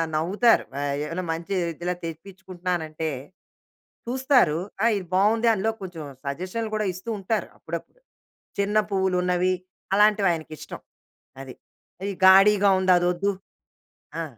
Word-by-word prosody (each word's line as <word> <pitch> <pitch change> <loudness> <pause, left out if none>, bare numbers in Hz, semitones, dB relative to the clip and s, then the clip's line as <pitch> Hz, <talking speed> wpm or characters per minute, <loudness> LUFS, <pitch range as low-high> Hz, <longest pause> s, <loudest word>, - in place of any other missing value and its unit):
నవ్వుతారు. 200 +9 +3
ఆ - - -2 0.2
ఏమైనా 165 +4 -4
మంచి 170 +4 -4 0.3
ఇలా 180 0 -1
తెప్పించుకుంటున్నానంటే 175 -2 -5 1.0
చూస్తారు 250 - +3 0.3
"ఆ! - - +4
ఇది 185 -3 -7
బావుంది." 220 +4 +3
అందులో 220 +2 0
కొంచెం 175 -4 -7 0.2
సజెషన్లు 185 +10 -4
కూడా 215 -2 0
ఇస్తూ 190 +6 -8
ఉంటారు 210 +3 -2
అప్పుడప్పుడు. - - -7 0.6
చిన్న 205 +2 +1
పువ్వులున్నవి 185 -1 +1 0.4
అలాంటివి 210 -2 +4
ఆయనకిష్టం. 155 -2 -8 0.6
అది. 130 -2 -9 0.5
"ఇది 200 0 -2
గాడీగా 195 +1 +6
ఉంది. 185 -1 +4
అదొద్దు." 180 +3 +1 0.9
ఆ! - - -3
190 Hz, 115 wpm, -25 LUFS, 175-210 Hz, 1.0 s, గాడీగా